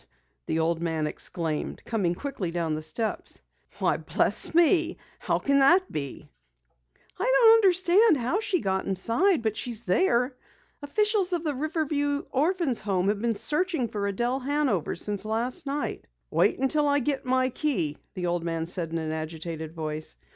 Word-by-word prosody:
the 160 - 0
old 165 +1 0
man 160 -2 -1
exclaimed, 155 0 -3
coming 190 -7 0
quickly 220 -7 -4
down 165 -2 -2
the 155 - -3
steps. 185 +9 -3 0.3
"Why - - +1
bless - - +1
me! 340 0 +4 0.2
How - - 0
can 280 0 +2
that 350 +8 +4
be?" 140 -3 -5 0.9
"I 480 +6 +1
don't 480 -3 +7
understand 375 -1 +5
how 255 - 0
she 410 -5 0
got 190 -1 -1
inside, 230 - +2
but 220 -1 0
she's 235 0 -3
there! 245 - +2 0.5
Officials 395 +5 +1
of 340 -2 -1
the 300 -3 -1
Riverview 290 0 -1
Orphans' 305 - +1
Home 195 -2 0
have 205 0 -1
been 230 -1 0
searching 300 - 0
for 205 -1 -2
Adelle 240 +6 -1
Hanover 270 - 0
since 205 +3 0
last 235 +9 -2
night." 285 +1 -3 0.2
"Wait - - +2
until 290 +3 +1
I 285 0 +3
get 280 0 -1
my 255 0 +1
key," 250 - -1 0.2
the 180 - -3
old 175 -1 -1
man 165 -1 -2
said 170 -1 -3
in 165 - -2
an 160 -1 -3
agitated 160 0 -5
voice. 155 -1 -5
240 Hz, 160 wpm, -26 LUFS, -, 0.9 s, don't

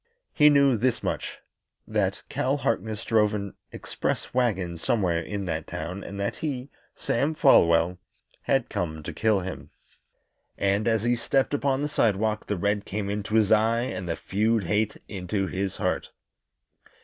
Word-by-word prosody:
He 150 -1 +6
knew 140 -4 +4
this 125 +2 0
much - - -3 0.5
that - - -1
Cal 135 +3 0
Harkness 110 -4 -2
drove 105 -2 +3
an 100 -1 -4 0.2
express - - -3
wagon 95 -9 0
somewhere 90 -4 +1
in 100 +4 -4
that 80 -3 -3
town, 90 +4 -5
and 100 - -7
that 100 - -2
he, 135 -3 -4 0.2
Sam 145 +6 0
Folwell, 85 - +4 0.4
had 135 -3 +1
come 80 -2 -3
to - - -6
kill 110 -3 +2
him. 95 +1 -7 0.9
And 100 +2 +1
as 110 -2 +2
he 120 +1 +2
stepped 135 +4 0
upon 140 -1 +1
the - - +1
sidewalk 110 -5 +1
the 105 - -1
red 100 +2 0
came 100 0 -3
into 105 +1 -3
his 110 -2 +3
eye 110 +2 +4
and 95 -7 -4
the 85 - 0
feud 110 +2 0
hate 105 +4 0
into 95 0 -2
his 95 0 -3
heart. - - -1
105 Hz, 160 wpm, -26 LUFS, 95-120 Hz, 0.9 s, He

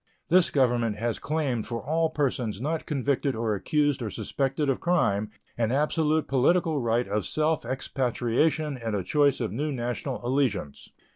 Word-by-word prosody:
This 180 +1 +5
Government 120 -5 +2
has 115 +1 -2
claimed 140 -8 -1
for 115 -1 -3
all 160 +5 0
persons 125 -9 -1
not 155 +5 -2
convicted 140 -1 0
or 110 -1 0
accused 145 +6 +1
or 110 - -2
suspected 135 +7 -2
of 135 - +1
crime 110 - +1 0.3
an 115 -1 +1
absolute 150 +2 +1
political 155 +3 +2
right 120 +1 +1
of 105 +1 -1
self 155 +1 0
expatriation 130 +3 0
and 115 -2 -2
a 95 - -1
choice 145 - +2
of 115 -6 -2
new 145 +8 -2
national 125 +1 -3
allegiance. 120 - -1
135 Hz, 155 wpm, -27 LUFS, 115-150 Hz, 0.3 s, This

